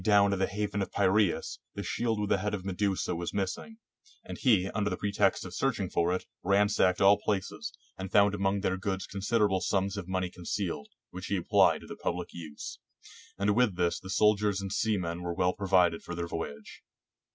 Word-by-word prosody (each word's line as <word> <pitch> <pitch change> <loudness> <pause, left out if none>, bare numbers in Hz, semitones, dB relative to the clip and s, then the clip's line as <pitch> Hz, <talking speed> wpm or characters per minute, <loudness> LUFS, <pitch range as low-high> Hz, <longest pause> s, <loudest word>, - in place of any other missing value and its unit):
113 100 -2 +4
GREECE - - -11
haven 105 -1 -1
of 95 - -3
Piraeus, 100 -1 +1 0.2
the - - -4
shield 115 -3 -1
with 105 -1 -2
the 100 - +3
head 105 +2 -1
of 95 -2 -8
Medusa 95 -1 -1
was 85 +3 -4
missing; 105 - -3 0.5
and - - -7
he, 105 -8 +4
under 105 -1 0
the 95 - -3
pretext 100 -2 +1
of 90 - -8
searching 105 -8 -1
for 85 +1 +2
it, 90 - -2 0.2
ransacked 100 -1 +3
all 100 +1 +6
places, 100 -3 -2 0.3
and 95 0 -5
found 100 -1 +5
among 100 0 0
their 95 -1 0
goods 95 0 -2
considerable 100 -1 +1
sums 100 +1 0
of 95 -3 -5
money 95 -1 -1
concealed, 85 -3 -3 0.2
which 95 +1 -7
he 100 - 0
ap 90 - -6
plied - - +5
to - - -11
the - - -8
pubHc 90 0 -2
use; 80 -4 -8 0.6
and 100 +1 +2
with 120 -6 +3
this 85 -1 0
the 95 - -10
soldiers 105 0 +3
and 95 -1 -5
seamen 90 -7 -1
were 85 -1 -3
well 90 +1 +2
provided 90 -4 +2
for 90 - -6
their 85 0 -2
voyage. 80 -4 -6
95 Hz, 195 wpm, -30 LUFS, 90-105 Hz, 0.6 s, all